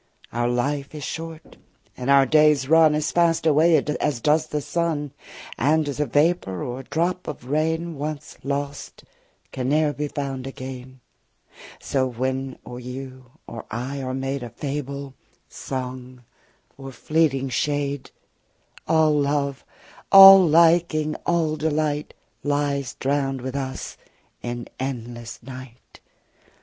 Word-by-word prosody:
60 - - -8
Our 120 - +2
life 140 +4 -2
is 150 - -6
short, 165 +1 -7 0.4
and 125 +1 -4
our 140 -1 +6
days 150 -1 +4
run 160 0 +5
As 150 0 -1
fast 170 -2 +2
away 160 +2 +5
as 150 -2 -1
does 150 +5 +2
the 150 - -2
sun. 150 -2 -2 0.5
And, 155 +1 +2
as 145 0 -4
a 150 - +1
vapour 145 - +1
or 125 +1 -5
a - - -8
drop 180 +3 -1
of 125 - -7
rain, 160 +2 0
Once 150 +1 -5
lost, 140 +1 -4 0.5
can 130 0 -3
ne'er 150 0 +2
be 150 +1 -3
found 135 -2 -4
again, 130 -1 -9 0.8
So 130 -2 0
when 130 +2 -3
or 125 - -8
you 130 0 -9
or 115 -2 -8
I 130 +5 -4
are 130 0 -3
made 135 +1 -3
65 120 - -6
A - - -30
fable, 140 -1 -4 0.3
song, 130 -1 -7 0.6
or 135 0 -8
fleeting 135 -1 0
shade, 140 +2 -2 0.8
All 160 -1 +4
love, 140 -1 0 0.5
all 195 -1 +11
liking, 165 -1 +3
all 160 -3 +1
delight 150 -1 -1 0.3
Lies 145 -2 -1
drown'd 135 -1 -1
with 130 +1 -5
us 130 -1 -5 0.4
in 120 0 -5
endless 120 -3 -6
night. 130 -1 -12
140 Hz, 135 wpm, -23 LUFS, 130-155 Hz, 0.8 s, all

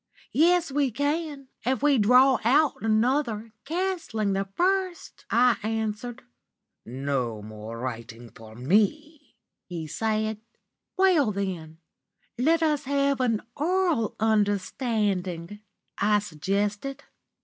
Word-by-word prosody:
"Yes 345 0 +3
we 280 -1 +1
can, 285 +2 -2
if 260 +1 0
we 285 -4 +4
draw 250 +5 +5
out 285 +6 +4
another, 225 0 0
cancelling 320 - -1
the 195 +1 -1
first,' 370 -1 -1
I 245 -2 +4
answered. 220 +3 -3 0.6
"'No 125 -4 -2
more 110 +1 -8
writing 115 -1 -6
for 110 -1 -13
me,' 220 - 0 0.3
he 170 -3 -5
said. 215 +5 -1 0.6
"'Well, 355 - +4
then, 180 -6 -4 0.6
let 325 +7 +2
us 300 -2 +1
have 280 0 +1
an 230 -4 +1
oral 335 - +1
understanding,' 205 -3 0 0.4
I 210 +1 +4
suggested. 205 - -2
225 Hz, 105 wpm, -26 LUFS, 195-285 Hz, 0.6 s, draw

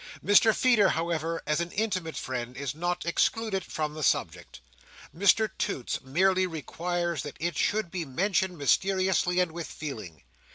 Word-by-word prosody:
Mr 205 +2 +6
Feeder, 215 -4 +4
however, 165 0 -2
as 150 +1 +1
an 170 0 -2
intimate 185 -7 -2
friend, 125 -1 -4
is 140 -1 -3
not 175 +3 -2
excluded 195 +3 0
from 155 -1 -3
the 155 - -7
subject. - - -1 0.6
Mr 200 +4 +4
Toots 125 - -2
merely 185 +7 +2
requires 170 0 -3
that 145 - -8
it 170 0 -2
should 210 0 0
be 180 -3 -3
mentioned 180 +5 0
mysteriously, 185 +4 +2
and 180 -2 +1
with 170 -1 -6
feeling. 105 - -7
170 Hz, 150 wpm, -28 LUFS, 155-190 Hz, 0.6 s, Mr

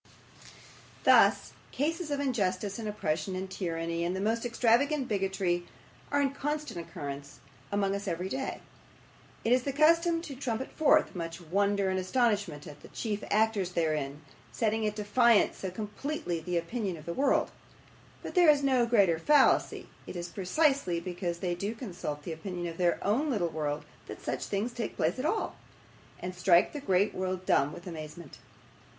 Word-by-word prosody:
Thus, - - +5 0.2
cases 325 +3 -1
of 285 -1 -1
injustice, 205 -7 -1
and 220 - -4
oppression, 185 -2 -2
and 190 +1 -3
tyranny, 170 -3 -3
and 175 +2 -1
the - - -2
most 225 +4 0
extravagant 255 +4 +2
bigotry, 190 -3 -1 0.4
are 285 - +2
in 275 -1 +2
constant 295 - -3
occurrence 145 -4 -7 0.3
among 200 -1 +1
us 200 +1 -4
every 180 +1 -2
day. 265 +6 -4 0.8
It 230 - +4
is 255 - +4
the 275 - -2
custom 330 +4 +4
to 290 - -6
trumpet 255 -1 -3
forth 310 - +3
much 165 -1 -5
wonder 200 +3 +1
and 185 - 0
astonishment 200 - 0
at 145 -1 -11
the - - -12
chief 210 -2 -4
actors 210 -4 +1
therein 155 -4 -1 0.3
setting 220 -2 0
at 210 - -2
defiance 215 +2 +3
so 190 - -4
completely 210 - -4
the 175 +2 -2
opinion 185 +1 -2
of 155 - -12
the 170 - -3
world; 275 +9 +2 0.7
but - - -6
there 355 -3 +6
is 290 -1 +5
no 255 -3 +3
greater 195 -8 +4
fallacy; 290 - +3 0.2
it - - -7
is 175 0 -4
precisely 200 - +1
because 175 -1 -4
they 180 -2 0
do 200 +6 -3
consult 175 - -5
the 165 - -4
opinion 175 +2 -5
of 165 -1 -5
their 175 -1 +3
own 250 +10 +1
little 200 -10 0
world 150 -2 -3 0.2
that - - -8
such - - -2
things 210 +4 -2
take 240 -3 -4
place 165 +10 0
at 260 - -2
all, 435 - -1 0.6
and 180 +1 -5
strike 180 -1 +4
the 295 - -4
great 195 -2 +2
world 185 0 -3
dumb 140 - +3
with 170 - -10
amazement. 160 -2 -8
200 Hz, 170 wpm, -30 LUFS, 175-245 Hz, 0.8 s, there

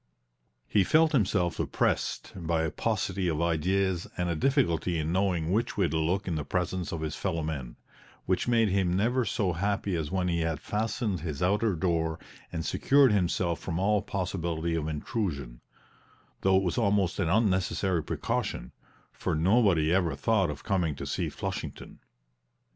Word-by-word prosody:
He 100 - +3
felt 160 - +4
himself 95 - +1
oppressed - - -1
by 85 -2 -1
a 80 - -1
paucity 95 -4 -1
of 80 -3 0
ideas 90 +2 +1
and 90 -1 0
a 85 - 0
difficulty 90 - +1
in 80 0 -1
knowing 90 -3 +1
which 115 +4 0
way 95 -4 +3
to 80 - -1
look 90 +6 0
in 90 - -1
the 75 -2 -2
presence 90 +3 -2
of 85 - -4
his 80 -1 -3
fellow 80 -1 -2
men, 70 -6 -4 0.5
which 95 +4 0
made 115 -3 +3
him 95 -2 +1
never 120 +6 +1
so 100 -3 0
happy 100 +1 -1
as 80 -3 -2
when 90 -1 0
he 85 -1 0
had 80 -2 -1
fastened 105 0 -2
his 75 -1 -4
outer 105 +2 +2
door 80 -2 0 0.3
and 80 - -4
secured 140 -3 +4
himself 90 -3 +1
from 85 -2 -4
all 100 +2 +2
possibility 85 -3 -2
of 80 -2 -1
intrusion; 75 - -3 0.8
though 95 0 +4
it 95 - +2
was 90 +6 0
almost 100 -5 +1
an 85 -4 +1
unnecessary 95 -3 +1
precaution, 60 -3 -3 0.4
for - - -2
nobody 85 -2 +3
ever 90 -3 +1
thought 110 -6 +1
of 75 - -6
coming 90 -7 0
to - - -6
see - - -2
Flushington. - - -6
90 Hz, 165 wpm, -28 LUFS, 80-100 Hz, 0.8 s, felt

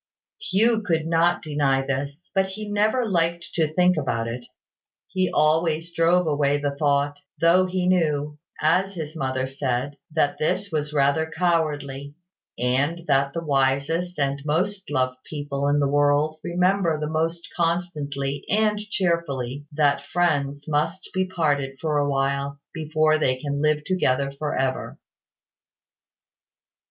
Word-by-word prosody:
Hugh 225 - +2
could 165 -6 0
not 165 +1 +2
deny 140 -3 +1
this; 140 +5 -4
but 190 -1 +2
he 210 +3 -7
never 215 +4 +1
liked 170 -3 -1
to 160 -2 +1
think 180 +1 +3
about 115 -6 -1
it: 120 +1 -5 0.6
he 185 -1 0
always 160 +2 +1
drove 175 +2 +3
away 145 -2 +2
the 145 -1 -2
thought; 145 -1 +1 0.2
though 175 +3 +4
he 180 0 -1
knew, 150 -5 +1 0.2
as 190 +5 +2
his 155 -1 -6
mother 130 -3 -1
said, 135 +1 -2 0.2
that 145 -3 +1
this 190 +5 -1
was 150 -1 -2
rather 150 +2 +2
cowardly, 150 -5 -1 0.4
and 140 +8 0
that 140 -2 +2
the 165 - -3
wisest 145 +5 +1
and 140 -1 0
most 185 +6 -1
loving 130 -2 0
people 145 -2 -3
in 145 0 +3
the 140 - +2
world 145 +2 +2
remember 180 -2 +1
the 150 - -2
most 165 +2 -2
constantly 150 -5 -2
and 210 0 +2
cheerfully 165 - -2
that 145 -1 +1
friends 145 -4 0
must 155 +5 -1
be 185 0 0
parted 145 -7 0
for 150 -2 0
a 145 0 +1
while, 140 0 -1
before 155 0 +1
they 130 -4 +1
can 140 0 -3
live 150 0 +2
together 140 -7 +1
for 145 +2 -3
ever. 130 0 -2
155 Hz, 140 wpm, -24 LUFS, 140-170 Hz, 0.6 s, though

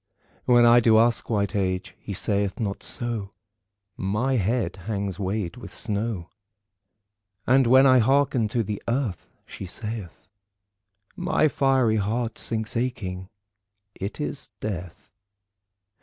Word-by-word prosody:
When 120 -1 +6
I 120 +1 +7
do 115 -2 +5
ask 115 +1 +2
white 100 -2 0
Age, 95 -2 -1
he - - -8
saith 100 0 -1
not 100 -3 -2
so, 115 -5 -4 0.6
"My 105 +8 0
head 115 +1 0
hangs 100 -3 -2
weighed 95 -1 -2
with 100 -6 -10
snow." 105 -4 -3 1.2
And 130 0 +4
when 130 +3 +7
I 130 -1 +6
hearken 135 -1 +3
to 115 +2 0
the 105 0 -4
Earth 115 - -1 0.2
she 95 - -8
saith 105 -3 -7 0.9
My 180 -4 +2
fiery 130 -5 +2
heart 110 +3 -1
sinks 110 -1 -3
aching. 100 -7 -3 0.6
It 100 +8 -6
is 145 -4 -4
death. 90 -5 -6
110 Hz, 125 wpm, -25 LUFS, 100-120 Hz, 1.2 s, I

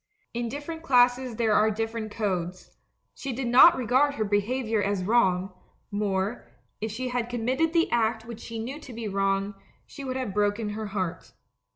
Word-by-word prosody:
In 235 0 -2
dif 290 +4 -6
ferent 325 0 -6
classes 250 -3 +3
there 220 -1 +2
are 215 +1 +4
different 225 +1 -3
codes 185 -4 -3 0.2
— - - -49
she 275 - -5
did 260 +2 -3
not 255 +8 +8
regard 260 +4 +2
her 215 - -1
behaviour 215 +2 0
as 200 -2 0
wrong; 190 -3 +2 0.4
more, 200 +2 -1 0.3
if 220 - -2
she 250 +4 -4
had 245 -1 -2
committed 255 +7 0
the 335 0 +3
act 225 -1 +1
which 230 -1 -8
she 230 0 -7
knew 250 +6 -5
to 275 -5 -11
be 230 -1 -5
wrong, 195 0 0 0.3
she 280 - -10
would 260 -1 -3
have 255 -7 -3
broken 210 +1 0
her 215 +1 -4
heart. 190 -4 -4
225 Hz, 185 wpm, -27 LUFS, 205-250 Hz, 0.4 s, not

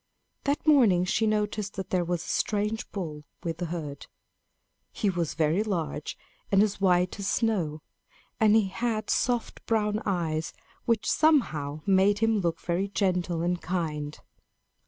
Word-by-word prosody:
That 285 +2 0
morning 230 - +5
she 215 +4 +1
noticed 210 -1 -1
that 190 -2 -6
there 180 -2 +2
was 175 0 -2
a - - -11
strange 210 +2 -1
bull 155 -7 -5 0.2
with 165 -1 -3
the 175 - -2
herd. 155 -4 -6 0.8
He 205 -3 0
was 170 -3 -2
very 160 +4 +2
large 170 -8 -3 0.3
and 195 0 +6
as 205 -2 -2
white 180 0 +2
as 195 - -3
snow; 175 -11 0 0.6
and 215 -2 +5
he 215 -3 +3
had 220 +1 -2
soft 245 -2 0
brown 215 -1 +1
eyes 160 -5 -1 0.3
which 230 -3 +1
somehow 155 - +2
made 195 +1 +4
him 225 0 +2
look 170 -3 -1
very 180 +3 -1
gentle 180 -4 0
and 175 0 0
kind. 155 -4 -3
190 Hz, 150 wpm, -27 LUFS, 170-215 Hz, 0.8 s, and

